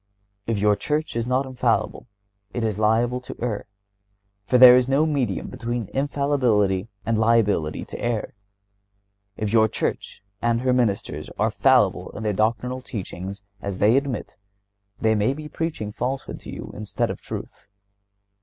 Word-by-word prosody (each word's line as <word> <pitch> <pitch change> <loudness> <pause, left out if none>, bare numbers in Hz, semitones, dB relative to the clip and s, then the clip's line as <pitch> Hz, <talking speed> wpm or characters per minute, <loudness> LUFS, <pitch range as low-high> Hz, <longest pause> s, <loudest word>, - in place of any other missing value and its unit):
If 115 -2 0
your 105 +1 +3
church 150 +5 -2
is 115 0 -1
not 130 +2 +1
infallible 125 -2 -1 0.5
it 120 - -1
is 110 -2 -1
liable 115 +3 +2
to - - -8
err, 115 -4 -3 0.8
for 125 - +4
there 125 0 +10
is 125 0 +3
no 140 +3 +3
medium 135 - -1
between 120 -3 -4
infallibility 130 -9 +1 0.2
and 115 0 +1
liability 110 -9 +2
to - - -8
error. 120 -3 -2 1.0
If 105 0 -2
your 110 -1 +5
church 100 - -3 0.2
and 115 0 +1
her 130 0 +2
ministers 115 -6 -1
are - - +1
fallible - - +3
in 110 - -5
their 105 -1 0
doctrinal 120 +5 0
teachings, 100 -4 -6 0.2
as 100 -2 -4
they 105 +5 +4
admit, 135 -4 -2 0.6
they 110 0 +3
may 110 +5 +1
be 155 0 -7
preaching 150 -9 -3
falsehood 130 +4 -4
to - - -11
you, - - -7
instead 105 0 -2
of - - -8
truth. - - -8
115 Hz, 155 wpm, -24 LUFS, 105-130 Hz, 1.0 s, there